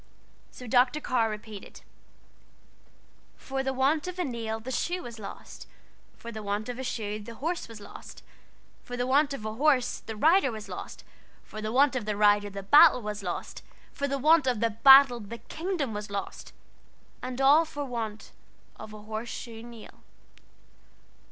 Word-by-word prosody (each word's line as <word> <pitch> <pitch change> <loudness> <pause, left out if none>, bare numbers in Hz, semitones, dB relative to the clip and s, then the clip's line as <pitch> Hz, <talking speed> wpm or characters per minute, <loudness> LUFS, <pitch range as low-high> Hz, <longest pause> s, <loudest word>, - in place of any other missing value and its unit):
So 250 - -12
Dr. 250 +4 +3
Carr 235 -6 0
repeated 215 -1 -9 1.6
"For 270 0 -4
the 265 0 -1
want 275 +5 +1
of 365 0 -6
a 360 - 0
nail 230 -5 -4
the 245 +4 -7
shoe 350 +8 -2
was 235 -2 -9
lost, 200 - -10 0.5
For 235 - -9
the 220 -1 -7
want 205 +2 -3
of 245 +1 -5
a - - -4
shoe 215 -4 -3
the 230 +2 -10
horse 330 +8 -3
was 225 -2 -11
lost, 205 - -12 0.6
For 245 - -7
the 245 - 0
want 280 +3 +3
of 275 -6 -6
a 215 - -3
horse 270 0 +2
the 220 - -8
rider 310 - +4
was 215 -2 -8
lost, - - -8 0.4
For 215 - -9
the 215 0 -3
want 270 +2 +4
of 235 -5 -3
a 210 -1 -1
rider 205 0 +4
the 200 0 -7
battle 290 +3 +7
was 210 0 -4
lost, 180 -3 -5 0.3
For 280 - -3
the 275 0 -1
want 305 +1 +4
of 235 -3 0
a 230 - +2
battle 265 +2 +7
the 225 +2 -8
kingdom 315 - -4
was 210 0 -6
lost, 200 0 -6 0.7
And 255 0 -5
all 285 +4 +6
for 290 -3 -6
want 225 -4 -5 0.5
of 215 - -10
a 210 -1 -11
horse 220 +2 -5
shoe 230 -2 -7
nail." 235 -1 -13
240 Hz, 175 wpm, -28 LUFS, 215-275 Hz, 1.6 s, battle